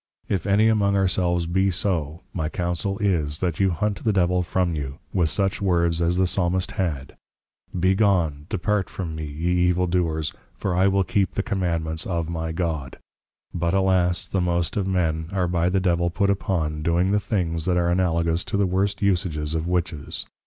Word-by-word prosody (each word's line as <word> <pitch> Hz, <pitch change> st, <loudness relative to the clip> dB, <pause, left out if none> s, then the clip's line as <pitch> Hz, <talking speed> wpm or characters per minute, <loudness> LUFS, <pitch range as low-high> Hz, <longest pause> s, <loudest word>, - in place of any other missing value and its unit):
If 95 Hz, -2 st, -1 dB
any 100 Hz, +3 st, +4 dB
among 100 Hz, -3 st, +3 dB
ourselves 90 Hz, -2 st, +1 dB
be 95 Hz, +3 st, +1 dB
so, 85 Hz, -4 st, -2 dB
my 80 Hz, -4 st, -2 dB
councel 90 Hz, +3 st, -2 dB
is, 80 Hz, -8 st, 0 dB
that 85 Hz, -3 st, -2 dB
you 95 Hz, -1 st, +4 dB
hunt 100 Hz, +4 st, -2 dB
the 110 Hz, -, +2 dB
Devil 90 Hz, -2 st, +2 dB
from 90 Hz, 0 st, 0 dB
you, 70 Hz, -3 st, -4 dB, 0.2 s
with 85 Hz, -4 st, +2 dB
such 95 Hz, +7 st, 0 dB
words 85 Hz, -3 st, +1 dB
as 85 Hz, +1 st, +1 dB
the 95 Hz, -, +3 dB
Psalmist 90 Hz, 0 st, 0 dB
had, 75 Hz, -8 st, -3 dB, 0.6 s
Be 95 Hz, +2 st, +3 dB
gone, 85 Hz, -8 st, +1 dB
Depart 105 Hz, -1 st, 0 dB
from 85 Hz, -4 st, -5 dB
me, 80 Hz, 0 st, -4 dB
ye 80 Hz, +4 st, -2 dB, 0.2 s
evil 90 Hz, +1 st, +2 dB
Doers, 85 Hz, -3 st, 0 dB, 0.2 s
for 95 Hz, -, -2 dB
I 95 Hz, +2 st, +3 dB
will 95 Hz, 0 st, +3 dB
keep 95 Hz, -1 st, 0 dB
the 100 Hz, -, 0 dB
Commandments 85 Hz, -7 st, -2 dB
of 85 Hz, -2 st, -2 dB
my 80 Hz, -1 st, -3 dB
God. 80 Hz, -6 st, -3 dB, 0.6 s
But 85 Hz, +1 st, 0 dB
alas, 95 Hz, -2 st, +2 dB
the 95 Hz, -, -1 dB
most 85 Hz, -1 st, 0 dB
of 100 Hz, -2 st, 0 dB
men, 80 Hz, -4 st, 0 dB
are 90 Hz, -2 st, +1 dB
by 85 Hz, 0 st, +1 dB
the 95 Hz, +1 st, +2 dB
Devil 85 Hz, -2 st, +1 dB
put 100 Hz, +3 st, +1 dB
upon 80 Hz, -6 st, -1 dB
doing 85 Hz, +4 st, +2 dB
the 105 Hz, -, +3 dB
things 85 Hz, -6 st, -1 dB
that 90 Hz, -1 st, +2 dB
are 85 Hz, 0 st, +2 dB
Analogous 85 Hz, -1 st, +1 dB
to -, -, -2 dB
the 100 Hz, -, +3 dB
worst 100 Hz, +2 st, 0 dB
usages 85 Hz, -6 st, 0 dB
of 80 Hz, +1 st, -2 dB
Witches. 85 Hz, -4 st, -2 dB
90 Hz, 190 wpm, -24 LUFS, 80-95 Hz, 0.6 s, any